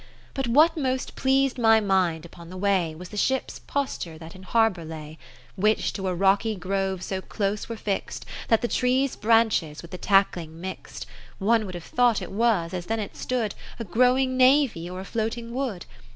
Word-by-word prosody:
But 270 -2 -2
what 305 +8 +5
most 260 -4 -2
pleased 270 -1 +2
my 225 -1 +6
mind 185 -6 +1
upon 170 0 -12
the 185 - -8
way, 185 -5 +1
Was 175 +2 -9
the 210 - -8
ships' 265 +5 0
posture 260 - -3
that 160 +1 -10
in 185 - -13
har 225 +4 +3
bour 175 -3 -9
lay: 155 -1 -9 0.4
50 - - -6
Which 215 +1 +2
to 190 -2 -3
a 180 - -1
rocky 195 +4 +2
grove 190 0 -2
so 190 0 -3
close 205 +2 -3
were 230 - -4
fix'd, 200 -2 -3 0.2
That 225 0 +3
the - - +2
trees' 255 +2 +1
branches 215 -9 +2
with 170 - -12
the 180 - -7
tackling 180 -5 +1
mix'd. 190 +2 -7 0.3
One 215 +1 +2
would 185 - -7
have 175 - -7
thought 245 +1 +2
it - - -7
was, 200 -5 +1
as 175 -1 -4
then 225 0 -1
it 205 - -5
stood, 235 -5 -2 0.2
A 230 - -4
growing 255 +6 +2
navy, 255 - +4
or 185 +1 -6
a - - -8
floating 230 +2 -3
wood. 245 -9 -3
205 Hz, 195 wpm, -25 LUFS, 180-240 Hz, 0.4 s, my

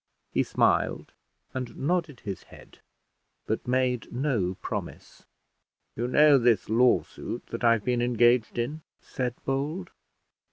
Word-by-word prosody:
He - - +2
smiled, - - +1 0.4
and 125 -2 -5
nodded 160 -3 -1
his 100 -2 -5
head, - - -16 0.7
but 110 +3 -3
made 125 -1 0
no 120 -9 0
promise. - - -7 0.7
"You 120 +2 -2
know 145 +2 +6
this 120 -4 +2
lawsuit 115 -8 +1
that - - -5
I've 115 -3 +4
been 125 -1 +1
engaged 120 -1 +3
in," 145 +7 -2 0.2
said 125 -2 -4
Bold. 150 +7 -2
125 Hz, 120 wpm, -27 LUFS, 120-135 Hz, 0.7 s, know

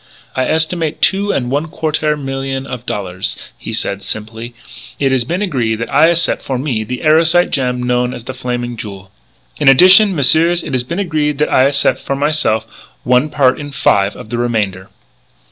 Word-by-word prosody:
"I 130 - 0
estimate 160 0 -1
two 200 +1 +1
and 125 -2 -2
one 145 +4 -1
quartaire 155 -1 -1
million 135 -1 -4
of 125 -3 -8
dollaires," 95 -3 -3 0.2
he - - -8
said 100 0 -3
simply. 110 +3 -6 0.4
"It 135 -2 +1
has 130 -2 +2
been 175 +11 -2
agree 125 - -1
that 115 +1 -6
I 155 +3 +5
accep' 170 0 +1
for 130 - -3
me 125 -5 -2
the 125 +3 -6
erosite 165 +3 +4
gem 125 -2 -1
known 125 0 0
as 125 -2 -8
The 130 - -6
Flaming 120 -2 -4
Jewel. 100 -3 -9 0.5
In 145 -3 +5
addition, 185 +8 +7
messieurs, 165 +4 +3
it - - -6
has 130 - +1
been 145 +8 -5
agree 155 -6 0
that 150 +1 -1
I 130 - +5
accep' 140 0 +1
for 140 - -3
myse'f 145 -6 0 0.4
one 125 +4 +2
part 135 -3 +2
in 145 -1 -6
five 100 -7 +1
of 110 - -11
the 120 - -2
remainder." 105 -6 -2
135 Hz, 185 wpm, -15 LUFS, 120-155 Hz, 0.5 s, addition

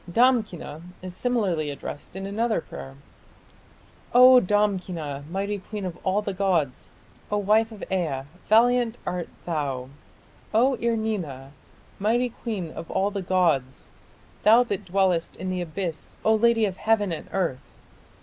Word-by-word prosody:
Damkina 215 - +1 0.2
is 185 -1 -7
similarly 190 -11 0
addressed 145 +3 -7
in 195 0 -5
another 220 +3 0
prayer: 70 - -9 1.2
O 255 +1 +9
Damkina, 180 - -1
mighty 200 +3 -2
queen 205 +1 -6
of 175 -2 -5
all 195 +2 +1
the 200 - -3
gods, 180 -9 -1 0.4
O 210 - +2
wife 215 +3 +3
of 215 - -9
Ea, 160 -8 -1 0.3
valiant 240 +1 +4
art 180 -1 -3 0.2
thou, 140 -6 -2 0.7
O 255 +5 +5
Ir 235 0 +1
nina, 165 -12 -3 0.5
mighty 235 +5 +2
queen 210 -8 -5
of 165 - -8
all 195 +2 +1
the 200 -1 -3
gods... 165 -9 +1 0.5
Thou 225 +3 +7
that 205 -4 -4
dwellest 185 -2 +1
in 185 +1 -4
the 180 -1 -2
Abyss, 170 -1 -5
O 220 - +5
lady 225 0 +4
of 190 -2 -3
heaven 215 -3 +2
and 160 - -5
earth!... 165 -9 -3
195 Hz, 140 wpm, -25 LUFS, 165-220 Hz, 1.2 s, O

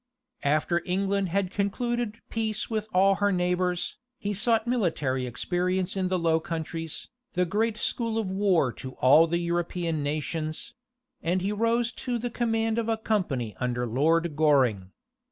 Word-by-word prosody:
After 155 +4 +2
England 195 +1 0
had 190 +1 0
concluded 230 +3 -1
peace 220 -1 -2
with 215 -1 -1
all 195 +1 +4
her 205 0 +4
neighbors, 180 -1 0 0.2
he 205 0 -2
sought 225 +2 +2
military 160 - 0
experience 180 - -1
in 190 -1 0
the 185 0 +1
Low 165 -2 +2
Countries, 165 -1 -4 0.2
the 180 -2 +2
great 215 +4 0
school 230 0 -1
of 220 -3 0
war 190 - +2
to 130 0 -8
all 150 +7 +6
the 170 +1 0
European 170 -2 -1
nations; 155 +2 -3 0.5
and 180 +2 0
he 200 - 0
rose 230 +3 +1
to 245 -2 -3
the 240 +1 -3
command 225 -1 0
of 230 0 -2
a 225 - +1
company 165 - -1
under 125 -1 -1
Lord 155 +7 +1
Goring. 130 -11 +3
180 Hz, 155 wpm, -27 LUFS, 160-215 Hz, 0.5 s, all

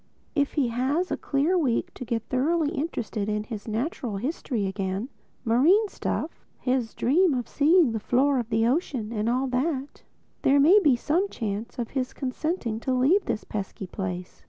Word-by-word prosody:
If 285 -2 +1
he 275 -6 +1
has 270 +10 0
a - - +2
clear 295 +6 0
week 255 -8 0
to - - -7
get 235 -2 -2
thoroughly 295 +6 +1
interested 235 - -3
in 210 0 -1
his 215 -1 -7
natural 230 -1 -2
history 245 -2 -2
again—marine 230 - 0
stuff, 335 - -4
his 250 -3 -1
dream 305 +5 +3
of 245 -2 -3
seeing 310 -1 +4
the 225 - -2
floor 265 +5 +2
of 235 -2 -4
the 225 0 +2
ocean 250 -5 -1
and 220 0 -1
all 255 +3 +1
that—there 275 0 -1
may 340 +9 +7
be 295 -10 +4
some 340 +11 0
chance 220 - -4
of 240 -2 -4
his 255 -2 -2
consenting 255 -3 -2
to 260 - -2
leave 305 +11 +3
this 215 - -2
pesky 195 -1 -5
place. 180 -1 -5
255 Hz, 165 wpm, -26 LUFS, 225-300 Hz, -, may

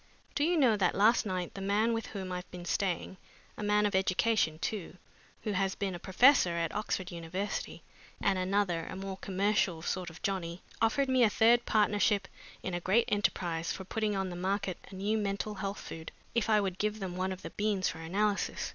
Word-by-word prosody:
Do 290 - +1
you 340 +2 +3
know 245 -8 +4
that 185 -3 +2
last 215 +3 +4
night 185 -2 -3
the 195 - -7
man 210 +4 +2
with 225 0 -2
whom 190 -3 -5
I 180 - -2
have 180 - -8
been 180 -1 -8
staying 185 0 -1 0.4
a - - -7
man 210 0 +3
of 205 - 0
education 190 -2 +2
too, 185 +1 -4 0.5
who 215 - -1
has 195 -1 0
been 195 -2 -2
a 175 - -6
professor 190 -2 +5
at 165 -1 -1
Oxford 195 -3 -2
University, 175 +4 -4 0.4
and 195 -2 +1
another, 185 -3 0
a - - -6
more 190 0 -5
commercial 195 -3 0
sort 180 -1 -2
of 165 - -14
Johnny, 180 -3 -2 0.2
offered 250 +5 +3
me 260 -1 +3
a 230 - +6
third 235 +3 +4
partnership 205 -1 +2 0.4
in 185 - -3
a 175 - -1
great 195 +7 +3
enterprise 175 -5 0
for 190 - -5
putting 215 +1 -1
on 190 -1 -1
the - - -5
market 190 0 -1
a - - -10
new 210 +3 0
mental 200 +1 -2
health 200 0 -4
food, 160 0 -8 0.2
if 235 -2 +1
I 215 -1 +5
would 190 -2 -3
give 210 +1 -1
them 185 -3 -4
one 185 +1 -1
of 185 0 -7
the - - -6
beans 205 -3 0
for 160 0 -7
analysis. 200 +5 -1
195 Hz, 210 wpm, -31 LUFS, 180-210 Hz, 0.5 s, a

